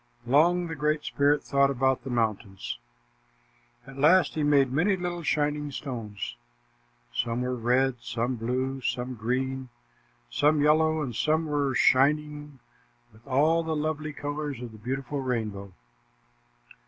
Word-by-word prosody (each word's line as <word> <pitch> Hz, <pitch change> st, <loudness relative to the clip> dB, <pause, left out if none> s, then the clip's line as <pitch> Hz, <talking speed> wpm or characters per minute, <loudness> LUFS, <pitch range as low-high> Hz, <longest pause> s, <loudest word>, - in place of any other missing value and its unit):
Long 170 Hz, +8 st, +4 dB
the 165 Hz, -, -5 dB
Great 150 Hz, 0 st, 0 dB
Spirit 145 Hz, +1 st, +2 dB
thought 140 Hz, 0 st, +3 dB
about 130 Hz, -1 st, +1 dB
the 135 Hz, -, -6 dB
mountains. 110 Hz, -, -2 dB, 1.1 s
At 135 Hz, 0 st, -11 dB
last, 170 Hz, +6 st, +5 dB
he 155 Hz, -, -2 dB
made 140 Hz, -3 st, +3 dB
many 180 Hz, +9 st, +2 dB
little 175 Hz, -1 st, -3 dB
shining 150 Hz, -1 st, 0 dB
stones. 115 Hz, -8 st, -6 dB, 0.8 s
Some 115 Hz, -, -1 dB
were 125 Hz, 0 st, -1 dB
red, 125 Hz, +2 st, +1 dB
some 120 Hz, +2 st, -2 dB
blue, 130 Hz, +3 st, -2 dB
some 125 Hz, +1 st, -2 dB
green, 130 Hz, +3 st, -2 dB, 0.6 s
some 150 Hz, -, +2 dB
yellow, 155 Hz, +1 st, +3 dB
and 125 Hz, -5 st, -5 dB
some 155 Hz, +5 st, +1 dB
were 145 Hz, -3 st, 0 dB
shining 150 Hz, +2 st, +2 dB, 0.6 s
with 110 Hz, +2 st, -21 dB
all 155 Hz, +5 st, +3 dB
the 160 Hz, -1 st, -2 dB
lovely 155 Hz, 0 st, -2 dB
colors 145 Hz, -2 st, -4 dB
of 120 Hz, -2 st, -7 dB
the 110 Hz, -, -13 dB
beautiful 135 Hz, +4 st, -3 dB
rainbow. 105 Hz, -6 st, -3 dB
135 Hz, 135 wpm, -27 LUFS, 125-150 Hz, 1.1 s, last